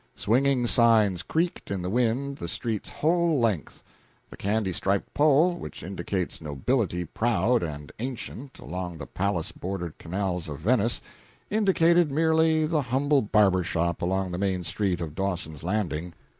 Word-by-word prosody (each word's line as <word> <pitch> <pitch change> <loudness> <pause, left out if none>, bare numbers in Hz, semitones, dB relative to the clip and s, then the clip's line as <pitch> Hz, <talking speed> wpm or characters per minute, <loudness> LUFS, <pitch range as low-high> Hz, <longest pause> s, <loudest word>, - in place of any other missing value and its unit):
Swinging 130 +2 +2
signs 110 -6 +4
creaked 170 - -2
in 95 -2 -2
the 90 - -2
wind, 125 +4 0
the 85 - -5
street's 110 +4 -3
whole 170 -1 +2
length. 110 -10 -1 0.5
The - - -8
candy 100 -1 -1
striped 100 +3 -1
pole 155 +4 +4
which - - -8
indicates 90 -1 -3
nobility 90 - -1
proud 115 +5 +1
and 75 -3 -5
ancient 130 +2 -6
along 90 0 -5
the - - -7
palace 90 -4 -2
bordered 90 -3 -5
canals 90 -1 -3
of 75 - -5
Venice, 115 - +1 0.5
indicated 175 -6 +4
merely 160 +1 +3
the 155 -1 +1
humble 135 +3 +2
barber 100 -4 +3
shop 85 0 -1
along 95 +1 0
the 90 - -3
main 95 -2 0
street 95 -2 -1
of 80 -3 -4
Dawson's 90 -5 -3
Landing. 90 -3 -2
100 Hz, 145 wpm, -26 LUFS, 90-135 Hz, 0.5 s, signs